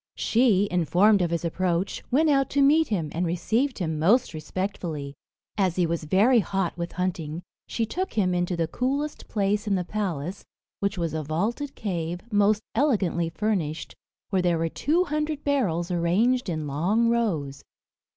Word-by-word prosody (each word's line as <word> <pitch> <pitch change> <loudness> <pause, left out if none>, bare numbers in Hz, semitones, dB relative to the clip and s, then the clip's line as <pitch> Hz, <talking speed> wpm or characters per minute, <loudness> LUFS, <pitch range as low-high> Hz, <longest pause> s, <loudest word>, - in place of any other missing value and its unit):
She, 220 -4 +3
informed 180 +4 +4
of 175 - +1
his 170 0 -2
approach, 180 +2 -1
went 300 +6 +3
out 275 -3 +3
to 280 0 +2
meet 310 +3 +4
him, 175 -9 -1
and 170 - -2
received 220 +10 0
him 160 -5 -2
most 200 +7 +3
respectfully. 160 -3 -4 0.5
As 185 -3 +2
he 180 - +2
was 165 -1 -2
very 215 +10 +4
hot 190 -2 -1
with 170 0 -5
hunting, 175 -3 -3 0.2
she 230 - -1
took 370 - -3
him 190 -5 +1
into 175 0 -1
the 165 -1 0
coolest 280 - -2
place 205 +1 0
in 200 - +2
the 180 - 0
palace, 180 -3 -3 0.4
which 200 -1 -1
was 165 -3 -2
a 160 - -1
vaulted 210 - -2
cave, 175 -3 -3
most 205 +1 +3
elegantly 200 - +1
furnished, 170 -5 -2 0.4
where 190 -2 +2
there 175 -2 +2
were 165 0 -1
two 325 - +1
hundred 300 -2 -2
barrels 190 - 0
arranged 195 +8 +1
in 155 -3 -2
long 180 +12 +1
rows. 160 -13 -1
185 Hz, 165 wpm, -25 LUFS, 170-230 Hz, 0.5 s, informed